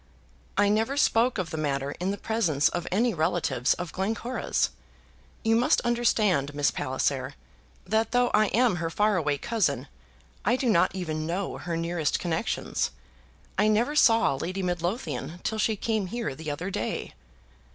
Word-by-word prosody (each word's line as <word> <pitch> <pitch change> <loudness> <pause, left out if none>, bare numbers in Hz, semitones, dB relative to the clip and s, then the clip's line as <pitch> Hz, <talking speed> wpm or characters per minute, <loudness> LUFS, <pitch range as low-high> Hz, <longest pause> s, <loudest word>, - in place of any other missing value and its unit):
"I 205 0 +4
never 225 +7 +1
spoke 240 -3 +3
of 180 -4 -3
the 160 - -3
matter 140 -2 -1
in 180 +2 -1
the 200 - -2
presence 175 -12 +1
of 175 -1 -4
any 225 +5 +2
relatives 160 -6 +1
of 175 -3 -6
Glencora's. 225 +6 -1 0.7
You 225 0 +3
must 240 +2 +3
understand, 215 - +1
Miss 145 -1 +2
Palliser, 130 -1 -1 0.5
that 220 +4 +1
though 245 0 +2
I 215 0 +4
am 225 -2 +2
her 165 -1 -2
far 210 +4 +2
away 150 -5 +1
cousin, 225 +5 0 0.6
I 240 - +3
do 255 -1 0
not 170 0 +3
even 155 -4 -3
know 180 +3 -3
her 170 -2 -3
nearest 165 -2 0
connections. 170 +4 -1 0.7
I - - +4
never 230 +7 +2
saw 230 - +5
Lady 185 +8 -3
Midlothian 175 0 -3
till 220 - -2
she 220 0 +2
came 215 -1 -1
here 230 - -3
the 155 +3 -7
other 165 +7 -3
day." - - -3
185 Hz, 160 wpm, -27 LUFS, 160-225 Hz, 0.7 s, saw